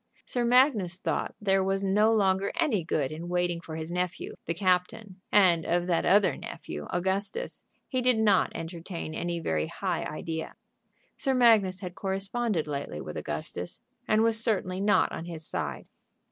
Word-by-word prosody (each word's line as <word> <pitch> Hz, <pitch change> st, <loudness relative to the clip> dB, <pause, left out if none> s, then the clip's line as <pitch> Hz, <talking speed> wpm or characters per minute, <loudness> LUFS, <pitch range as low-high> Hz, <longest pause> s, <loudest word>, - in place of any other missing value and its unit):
Sir 245 Hz, -, +1 dB
Magnus 235 Hz, -, +4 dB
thought -, -, -2 dB
there 195 Hz, -2 st, +2 dB
was 195 Hz, +1 st, 0 dB
no 210 Hz, +3 st, +4 dB
longer 195 Hz, -3 st, +2 dB
any 225 Hz, -, +1 dB
good 150 Hz, -4 st, -1 dB
in 165 Hz, +3 st, -6 dB
waiting 175 Hz, -1 st, 0 dB
for 160 Hz, -2 st, -8 dB
his 160 Hz, +1 st, -5 dB
nephew, 180 Hz, 0 st, -3 dB
the 170 Hz, -, 0 dB
captain, 185 Hz, +2 st, 0 dB
and 180 Hz, -5 st, +5 dB
of 175 Hz, +2 st, +1 dB
that 175 Hz, -2 st, +1 dB
other 200 Hz, 0 st, +4 dB
nephew, 75 Hz, -, -7 dB
Augustus, 195 Hz, -, -2 dB, 0.3 s
he 255 Hz, -2 st, -1 dB
did 250 Hz, -2 st, +3 dB
not 210 Hz, -4 st, +3 dB
entertain 165 Hz, 0 st, -6 dB
any 175 Hz, +1 st, -2 dB
very 80 Hz, -, -1 dB
high -, -, -2 dB
idea. 160 Hz, +1 st, -5 dB, 0.6 s
Sir 270 Hz, -2 st, +1 dB
Magnus 215 Hz, -6 st, +4 dB
had 180 Hz, -2 st, -5 dB
corresponded 195 Hz, 0 st, -1 dB
lately 140 Hz, -, -4 dB
with -, -, -7 dB
Augustus, 90 Hz, -, -5 dB, 0.3 s
and 215 Hz, +1 st, +4 dB
was 225 Hz, 0 st, +2 dB
certainly 190 Hz, -5 st, 0 dB
not 205 Hz, +1 st, +3 dB
on 165 Hz, -, -5 dB
his 165 Hz, -2 st, -7 dB
side. -, -, -4 dB
185 Hz, 160 wpm, -28 LUFS, 170-210 Hz, 0.6 s, and